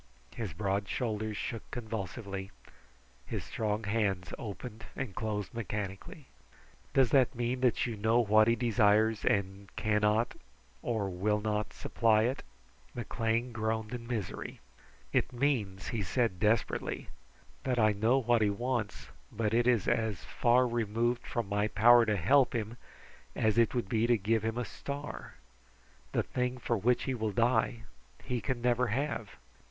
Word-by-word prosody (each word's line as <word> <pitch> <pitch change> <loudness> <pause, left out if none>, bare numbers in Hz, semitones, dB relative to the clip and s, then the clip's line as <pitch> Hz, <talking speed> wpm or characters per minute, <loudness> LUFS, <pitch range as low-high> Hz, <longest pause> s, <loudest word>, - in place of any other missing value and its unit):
His 110 -6 -4
broad 100 +2 -1
shoulders 110 -3 -2
shook 115 - -5
convulsively. 100 -3 -5 0.8
His - - -3
strong 110 0 -2
hands 100 -4 -1
opened 110 +1 -7
and 130 -8 -4
closed 105 0 -3
mechanically. 105 - -5 0.7
"Does 130 -3 +4
that 135 -1 +4
mean 120 +2 -1
that 125 -3 +2
you 120 -3 -3
know 110 +3 +2
what 110 -1 +5
he 115 - +4
desires 110 -2 +3
and 100 0 0
cannot, 105 +1 +2 0.5
or 110 -4 -1
will 100 +3 0
not, 105 0 -1
supply 110 -2 +2
it?" 125 +4 -1 0.5
McLean 115 +1 -1
groaned 110 0 -2
in 120 -1 -6
misery. 115 -6 -4 0.5
"It - - +2
means," 120 -8 -1
he 115 - -2
said 100 0 0
desperately, 110 +1 0 0.5
"that 130 -2 0
I 110 -2 +5
know 110 +5 +2
what 120 -3 +2
he 105 - +4
wants, 120 0 -2 0.2
but 110 0 -1
it 120 +1 +3
is 120 -6 +3
as 110 -8 0
far 125 +1 +3
removed 120 +1 -1
from 120 -4 -2
my 105 +1 +1
power 120 +2 +6
to 105 -1 +2
help 130 +9 +4
him 110 0 -2 0.6
as 110 -1 +2
it 115 +1 +3
would 120 -5 -1
be 110 +3 +1
to 120 -1 +4
give 110 +2 +1
him 110 +2 -2
a 125 - -1
star. 145 +4 -7 0.8
The - - +1
thing 125 0 -2
for 125 - -1
which 120 +5 +2
he 130 - -1
will 110 -3 -1
die, 115 +1 +1 0.4
he 125 -2 -2
can 120 +3 -3
never 125 0 +2
have." 115 -2 -2
110 Hz, 150 wpm, -31 LUFS, 105-120 Hz, 0.8 s, power